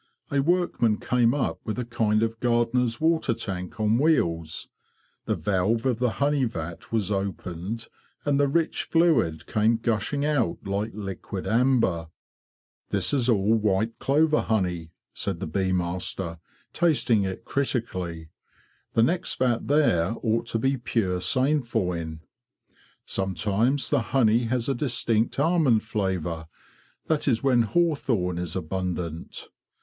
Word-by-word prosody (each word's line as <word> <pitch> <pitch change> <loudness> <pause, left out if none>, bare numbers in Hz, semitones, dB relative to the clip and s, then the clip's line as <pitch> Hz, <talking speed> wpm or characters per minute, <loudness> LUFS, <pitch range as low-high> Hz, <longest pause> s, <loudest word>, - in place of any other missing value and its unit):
A 140 -1 +2
workman 160 -9 +2
came 120 -2 +2
up 140 - -1
with 110 - -4
a 125 - -2
kind 110 -2 +1
of 115 0 -2
gardener's 120 0 +1
water 160 -7 +2
tank 90 -1 -5
on 110 +2 +2
wheels. 85 - +1 0.6
The - - 0
valve 105 +4 0
of 125 -3 +1
the 125 -2 +1
honey 140 -1 +1
vat 85 -6 -6
was 105 -3 0
opened, 95 +2 -4 0.4
and 145 -1 +2
the 145 - +4
rich 165 +3 0
fluid 155 - +2
came 110 +2 +2
gushing 120 +5 -1
out 145 -6 +1
like 100 +3 -1
liquid 100 -2 -5
amber. 115 -9 +2 0.4
'"' - - -59
This 100 +6 0
is 130 -3 +2
all 105 -1 +3
white 110 0 +1
clover 155 +2 +3
honey,'' 90 -7 -1 0.2
said 95 -4 -3
the - - -3
bee 95 +4 -1
master, 90 -1 -2 0.3
tasting 145 -10 +2
it 95 -1 -4
critically. 95 - -2 0.3
'' - - -38
The 115 - +5
next 175 +9 0
vat 125 -3 +1
there 115 - +3
ought 115 +1 0
to 115 - 0
be 135 +4 +1
pure 110 -7 -1
sainfoin. 95 - 0 0.8
Sometimes 105 +8 0
the 145 -4 +3
honey 115 -1 +2
has 120 0 -1
a 135 - +2
distinct 120 -3 0
almond 150 -8 +3
flavour; 90 -7 -2 0.6
that 155 -2 0
is 120 -3 +2
when 130 -3 +4
hawthorn 115 - +1
is 90 -1 -4
abundant. 90 -2 -4
115 Hz, 140 wpm, -26 LUFS, 95-130 Hz, 0.8 s, The